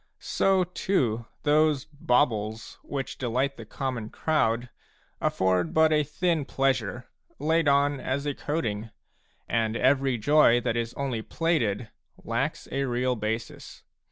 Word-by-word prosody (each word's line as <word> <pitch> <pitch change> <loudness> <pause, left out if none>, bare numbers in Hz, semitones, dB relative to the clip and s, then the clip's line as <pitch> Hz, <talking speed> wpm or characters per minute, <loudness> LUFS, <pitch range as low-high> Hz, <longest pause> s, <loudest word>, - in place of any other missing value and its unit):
So 190 -1 +2
too 130 - -1 0.2
those 150 -2 +3
baubles 115 -7 0
which 135 -2 -5
delight 130 +3 0
the 115 -4 -10
common 125 -4 -4
crowd 120 -6 0 0.5
afford 90 -2 +1
but 160 0 +5
a 150 - +4
thin 155 +2 0
pleasure, 135 -2 -1 0.3
laid 160 +2 +1
on 140 0 +3
as 135 +3 -2
a 145 - 0
coating, 115 -9 -3 0.6
and 115 -1 0
every 135 0 +2
joy 130 0 +5
that 115 - -1
is 115 0 -2
only 130 -5 -2
plated 115 -8 -1 0.3
lacks - - -2
a 135 +1 0
real 125 0 0
basis. 110 +1 -5
130 Hz, 130 wpm, -27 LUFS, 115-150 Hz, 0.6 s, but